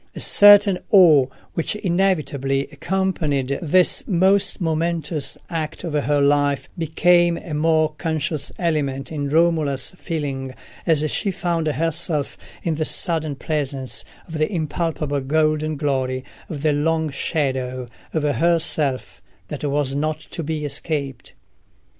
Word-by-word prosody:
A - - -6
certain 205 -2 +7
awe 160 -9 +6 0.3
which 165 - -1
inevitably 160 -8 0
accompanied 155 -8 -1
this 180 +2 +3
most 190 +1 +2
momentous 165 -2 -2
act 160 -1 -4
of 170 -4 -4
her 145 0 +1
life 145 0 +2
became 175 +1 +3
a 160 - -8
more 155 0 +2
conscious 160 -2 -2
element 140 -6 -1
in 145 -3 -3
Romola's 155 -4 +1
feeling 135 -6 -4 0.3
as 155 -2 +2
she 200 - -1
found 170 -4 -1
herself 155 0 -1 0.3
in 165 - 0
the 155 0 -1
sudden 155 -2 0
presence 135 -3 -3 0.2
of 160 -2 -6
the 155 - +1
impalpable 155 -4 -2
golden 155 +2 0
glory 130 -3 -2 0.2
and 145 -3 -6
the 155 -1 +3
long 160 +1 0
shadow 130 -4 -2 0.2
of 155 - -1
herself 150 - 0 0.3
that 150 - -6
was 145 -2 0
not 155 +2 -1
to 160 - -5
be 155 -1 -3
escaped. 140 -3 -3
155 Hz, 125 wpm, -21 LUFS, 140-165 Hz, 0.3 s, certain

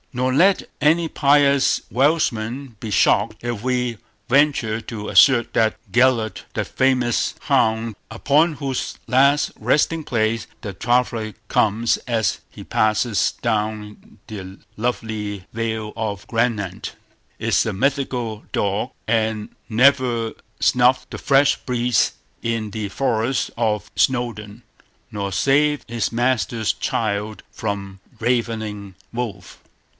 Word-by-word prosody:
Nor 130 +1 0
let 185 +8 +4 0.2
any 165 +2 +3
pious 140 -2 +3
Welshman 130 -3 0
be 110 - -5
shocked 105 +2 +2
if 120 -4 -3
we 125 -2 -1 0.3
venture 135 -5 +2
to 110 -1 -7
assert 125 -4 +5
that 110 -1 +2 0.2
Gellert, 120 -3 +2
that - - -2
famous 125 -3 +1
hound 110 0 +1
upon 145 +9 +2
whose 135 -3 -4
last 140 +3 +3
resting 160 +2 +1
place 115 -4 -1
the 105 -5 -5
traveller 115 +1 0
comes 110 +2 +2
as 115 -3 0
he - - -11
passes 110 0 +1
down 105 -2 -3
the 95 -3 -8 0.2
lovely 105 -4 -3
vale 110 -1 -3
of 105 -3 -4
Gwynant, 115 -5 -2 0.4
is - - +2
a 110 - -1
mythical 125 -1 -1
dog, 100 +5 -1 0.2
and 110 -1 0 0.2
never 120 -1 +3 0.3
snuffed 125 +1 +3
the - - -6
fresh 140 0 +4
breeze 125 -1 +1 0.3
in 115 -2 -2
the 105 -1 -4
forest 120 +2 0
of 110 -3 -1
Snowdon, 115 -3 -1 0.5
nor 100 -2 -3
saved 145 +7 +2
his 115 -2 -2
master's 120 -2 0
child 105 -1 -2
from 100 -2 -5 0.2
ravening 110 -5 -2 0.2
wolf. 120 -3 -5
115 Hz, 115 wpm, -21 LUFS, 110-130 Hz, 0.5 s, assert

